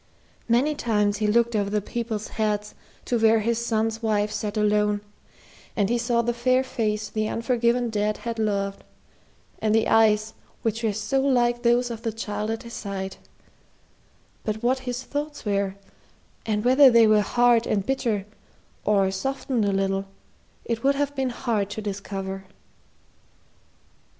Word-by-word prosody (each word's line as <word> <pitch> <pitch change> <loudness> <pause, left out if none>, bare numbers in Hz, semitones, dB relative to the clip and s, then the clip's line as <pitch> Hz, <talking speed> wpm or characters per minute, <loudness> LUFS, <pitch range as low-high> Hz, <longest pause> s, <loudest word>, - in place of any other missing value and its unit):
Many 255 +6 +3
times 210 -6 0
he 215 0 0
looked 235 +2 +2
over 200 -1 +1
the 210 +1 +1
people's 220 0 -4
heads 210 -1 -1 0.3
to 240 - 0
where 225 0 +4
his 235 +2 0
son's 225 -1 -1
wife 210 -2 +1
sat 215 0 -3
alone, 210 -1 +2 0.7
and 205 -2 +1
he 240 - +1
saw 235 0 +1
the 240 +1 0
fair 255 +2 +2
face 215 -4 -2
the 215 +1 -2
unforgiven 235 0 +1
dead 210 0 0
had 230 -1 -5
loved, 200 -2 -1 0.8
and 215 0 +1
the 225 - +3
eyes 220 -1 +3 0.3
which 225 0 -1
were 225 -2 +1
so 245 +6 -1
like 240 -3 +2
those 240 0 +2
of 230 -1 -6
the 230 -1 -2
child 210 -1 -4
at 225 0 -3
his 235 0 -10
side; 195 -2 -5 1.3
but 220 +1 -3
what 255 +2 +2
his 245 +1 -3
thoughts 290 +1 -5
were, 200 -1 0 0.7
and 210 0 0
whether 265 +2 +7
they 235 -2 +6
were 215 -1 +5
hard 240 +2 +3
and 200 -2 0
bitter, 230 -6 -1 0.6
or 195 -2 +2
softened 260 +2 -2
a 200 - +1
little, 195 0 0 0.6
it 230 -1 -3
would 275 +1 +3
have 285 0 -1
been 265 -1 0
hard 220 -4 -1
to 205 - -5
discover. 195 -2 -5
220 Hz, 155 wpm, -25 LUFS, 210-240 Hz, 1.3 s, whether